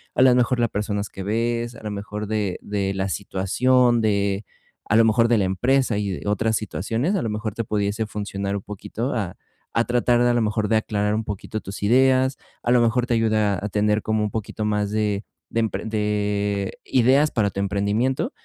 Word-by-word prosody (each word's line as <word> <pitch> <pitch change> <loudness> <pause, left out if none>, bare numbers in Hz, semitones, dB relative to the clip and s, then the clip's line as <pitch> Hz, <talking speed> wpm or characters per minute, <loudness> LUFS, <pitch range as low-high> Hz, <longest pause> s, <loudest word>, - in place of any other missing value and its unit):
a - - +5
la 130 -1 +7
mejor 125 0 +2
la 120 - +3
personas 105 -1 -3
que 95 - -8
ves, 115 +3 -1
a - - -13
la 105 - -4
mejor 105 +1 -5
de 105 -3 -1
de 100 -1 -2
la 95 0 -1
situación, 120 +6 +2
de 100 -1 0 0.4
a 105 - +1
lo 115 0 +6
mejor 115 +1 +4
de 115 -1 +3
la 100 - +2
empresa 120 +6 +1
y 100 -1 -2
de 95 +1 -5
otras 110 +2 +1
situaciones, 115 - -1
a 190 - 0
lo 115 - -2
mejor 105 0 -3
te 115 - -3
pudiese 105 +1 -1
funcionar 100 -1 -3
un 100 - -4
poquito 105 +5 -4
a 100 -6 -3 0.4
a 115 - +4
tratar 120 0 +2
a 120 0 +3
lo 120 - +2
mejor 105 -1 0
de 110 - +4
aclarar 105 -1 0
un 110 0 -2
poquito 105 +1 -5
tus 100 0 -8
ideas, 130 +4 +3 0.3
a 120 - +1
lo 125 - +5
mejor 120 +1 +2
te 125 - +1
ayuda 110 -4 +2
a - - -1
tener 105 +1 +1
como 110 0 0
un 105 - -2
poquito 110 0 -4
más 105 -1 0
de 105 -1 -1 0.3
empren 110 -1 -1
de 110 - -2
de 105 -1 -1
ideas 130 +4 +4
para 105 -3 +1
tu 100 - -6
emprendimiento. 100 - 0
105 Hz, 210 wpm, -23 LUFS, 100-120 Hz, 0.4 s, la